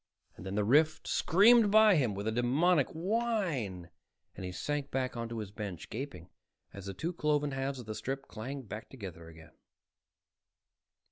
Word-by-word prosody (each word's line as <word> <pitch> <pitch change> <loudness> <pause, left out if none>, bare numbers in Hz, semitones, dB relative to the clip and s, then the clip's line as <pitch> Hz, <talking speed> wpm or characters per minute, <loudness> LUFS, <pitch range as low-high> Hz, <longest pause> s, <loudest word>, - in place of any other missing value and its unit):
Then 95 +2 -6
the 105 - +2
rift 150 +8 +3
screamed 215 +5 +5
by 215 -1 +7
him 125 - +1
with 100 +2 -4
a - - +1
demoniac 135 +7 +3
whine 165 - -2 0.4
and - - -8
he 90 - -4
sank 145 +8 -3
back 130 -1 -2
onto 115 0 -4
his 105 -3 -5
bench, 100 -5 -7
gasping 115 - -6 0.5
as 100 -1 -9
the 100 - -5
two 165 - -3
cloven 150 -3 0
halves 135 0 -2
of 125 - -8
the 110 - -5
strip 135 +5 -4
clanged 125 +3 -7
back 105 +2 -7
together 95 -9 -9
again. 80 -1 -14
130 Hz, 160 wpm, -32 LUFS, 100-155 Hz, 0.5 s, by